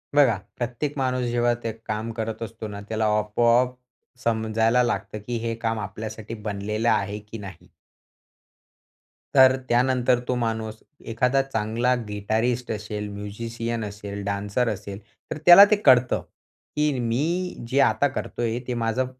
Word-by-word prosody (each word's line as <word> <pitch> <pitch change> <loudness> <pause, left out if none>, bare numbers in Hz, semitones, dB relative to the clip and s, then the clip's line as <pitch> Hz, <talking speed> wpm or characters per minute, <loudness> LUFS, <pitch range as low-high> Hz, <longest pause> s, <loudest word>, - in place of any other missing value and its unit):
बघा 130 -8 +5 0.2
प्रत्येक 125 +4 -3
माणूस 130 -1 0
जेव्हा 120 0 +2
ते 115 - -1
काम 110 +2 -3
करत 110 0 -3
असतो 115 -1 -7
ना 100 -1 -7
त्याला 110 0 0
आपोआप 120 +4 +2 0.5
समजायला 115 +1 +2
लागतं, 120 -2 -2
की 120 -1 -1
हे 115 - -1
काम 115 -1 -2
आपल्यासाठी 110 +2 -6
बनलेलं 105 +1 -2
आहे, 100 0 0
की 105 +2 -10
नाही. 95 -4 -11 1.7
तर 130 0 +7
त्यानंतर 125 0 +3
तो 125 - 0
माणूस 110 -2 -2 0.3
एखादा 125 +4 +2
चांगला 120 -1 0
गिटारिस्ट 110 +4 -1
असेल, 105 -1 -4
म्युझिशियन 115 +3 -4
असेल, 100 0 -7
डान्सर 100 +4 -1
असेल 100 -1 -5 0.3
तर - - -2
त्याला 175 +3 +11
ते - - +7
कळतं, 125 -2 +5 0.5
की 150 0 +2
मी 155 +11 -1
जे 135 +3 +1
आता 145 - +2
करतोय 120 -3 -3
ते 125 - -1
माझं 115 +2 0
115 Hz, 140 wpm, -24 LUFS, 105-125 Hz, 1.7 s, त्याला